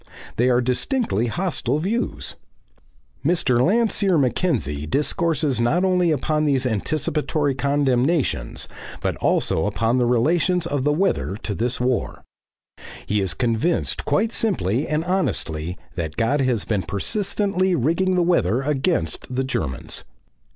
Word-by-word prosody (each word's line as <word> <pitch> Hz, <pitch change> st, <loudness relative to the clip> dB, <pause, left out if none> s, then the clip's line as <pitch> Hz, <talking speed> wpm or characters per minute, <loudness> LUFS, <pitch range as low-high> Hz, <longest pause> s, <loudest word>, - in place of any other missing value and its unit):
They 125 Hz, +2 st, +3 dB
are 125 Hz, 0 st, +3 dB
distinctly 125 Hz, -, 0 dB
hostile 155 Hz, -3 st, -1 dB
views. 150 Hz, -, -2 dB, 0.9 s
Mr. 140 Hz, -7 st, +2 dB
Landseer 200 Hz, -, +2 dB
Mackenzie 120 Hz, -, 0 dB
discourses 150 Hz, -, 0 dB
not 160 Hz, +11 st, +2 dB
only 180 Hz, -2 st, +2 dB
upon 155 Hz, +1 st, 0 dB
these 135 Hz, -3 st, +1 dB
anticipatory 145 Hz, +5 st, -1 dB
condemnations 135 Hz, -, 0 dB, 0.3 s
but -, -, -1 dB
also 80 Hz, +5 st, +1 dB
upon 115 Hz, +4 st, +1 dB
the 120 Hz, -, +2 dB
relations 165 Hz, +9 st, +2 dB
of 145 Hz, -5 st, -1 dB
the 150 Hz, -, +3 dB
weather 160 Hz, -, 0 dB
to 105 Hz, -, -2 dB
this 120 Hz, +4 st, -1 dB
war. 125 Hz, 0 st, -1 dB, 0.8 s
He 105 Hz, 0 st, 0 dB
is 95 Hz, -2 st, -1 dB
convinced 120 Hz, +8 st, 0 dB
quite 220 Hz, +2 st, +1 dB
simply 140 Hz, -, 0 dB
and 155 Hz, +1 st, 0 dB
honestly 90 Hz, -, -1 dB, 0.2 s
that 80 Hz, -3 st, -4 dB
God 130 Hz, +6 st, +2 dB
has 125 Hz, -5 st, 0 dB
been 105 Hz, -4 st, 0 dB
persistently 190 Hz, -, 0 dB
rigging 170 Hz, +7 st, +1 dB
the 180 Hz, -, +3 dB
weather 135 Hz, -, +2 dB
against 135 Hz, -, -1 dB
the 130 Hz, +1 st, -1 dB
Germans. 65 Hz, -, -3 dB
135 Hz, 130 wpm, -22 LUFS, 115-175 Hz, 0.9 s, They